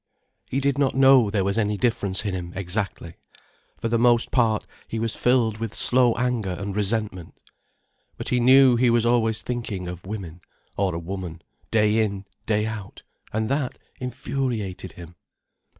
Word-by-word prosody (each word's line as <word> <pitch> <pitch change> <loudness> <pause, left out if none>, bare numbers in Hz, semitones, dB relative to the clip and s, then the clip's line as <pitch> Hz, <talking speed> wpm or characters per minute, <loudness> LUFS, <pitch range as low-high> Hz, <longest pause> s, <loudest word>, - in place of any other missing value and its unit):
He 135 - 0
did 140 0 0
not 135 -3 +2
know 135 -4 +6
there 100 -1 0
was 100 +3 0
any 105 -1 0
difference 105 -4 0
in 100 - -1
him, 85 -1 -5
exactly; 95 -3 -3 0.6
for - - -2
the 115 0 +1
most 120 0 +3
part 115 -4 +2 0.2
he 115 - -4
was 115 0 -2
filled 120 -4 +2
with 115 -2 -4
slow 125 -2 +4
anger 120 -7 -1
and 100 -1 -5
resentment. 105 -4 -2 0.8
But - - -4
he 125 - +2
knew 130 0 +6
he 125 0 +3
was 120 -1 +3
always 115 -2 +2
thinking 115 -7 -4
of 90 +1 -8
women, 90 -5 -6 0.3
or 95 -3 0
a - - -2
woman, 85 -1 -6 0.3
day 105 0 +3
in, 100 -2 -1 0.2
day 105 -1 +1
out, 110 -3 -7 0.3
and 110 0 -1
that 140 -2 -1 0.2
infuriated 125 - -3
him. 85 0 -12
110 Hz, 165 wpm, -24 LUFS, 95-120 Hz, 0.8 s, know